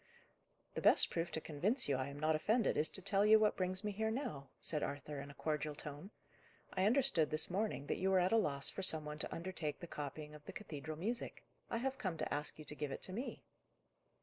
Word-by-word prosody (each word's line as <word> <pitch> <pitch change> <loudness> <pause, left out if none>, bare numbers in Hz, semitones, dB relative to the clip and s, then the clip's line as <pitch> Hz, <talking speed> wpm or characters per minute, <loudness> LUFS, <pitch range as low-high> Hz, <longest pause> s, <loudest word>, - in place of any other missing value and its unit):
"The - - -3
best - - +6
proof 170 0 -1
to - - 0
convince 200 - 0
you 140 - +2
I 130 +1 -1
am 140 +1 -7
not 155 +1 +3
offended, 215 +8 +2
is 155 - +3
to 190 - -3
tell 195 +1 +3
you 215 +1 +8
what 215 -1 +3
brings 185 +1 0
me 210 - -1
here 220 +2 0
now," 220 - -3
said 150 -2 -1
Arthur 145 0 -3
in 140 - -8
a 140 - -11
cordial 150 0 -1
tone. 150 +5 -7 0.6
"I 190 +2 +3
understood, 240 - +3
this 155 +3 0
morning, 195 -7 -1
that - - -1
you 190 - +2
were 190 -1 +5
at 180 +4 +3
a - - +6
loss 140 -10 +2
for - - -2
some 160 -5 +2
one 150 0 -5
to - - -3
undertake 165 -4 -3
the - - -6
copying 150 -1 -6
of 150 -1 -11
the - - -7
cathedral 155 -5 -6
music: 230 +8 -2 0.3
I - - 0
have 265 +3 -2
come 185 -5 -2
to - - -2
ask 150 +1 -1
you 155 - -9
to 150 - -1
give 150 -2 -3
it - - -5
to 185 - +3
me." 245 +7 -4
165 Hz, 240 wpm, -38 LUFS, 150-210 Hz, 0.6 s, you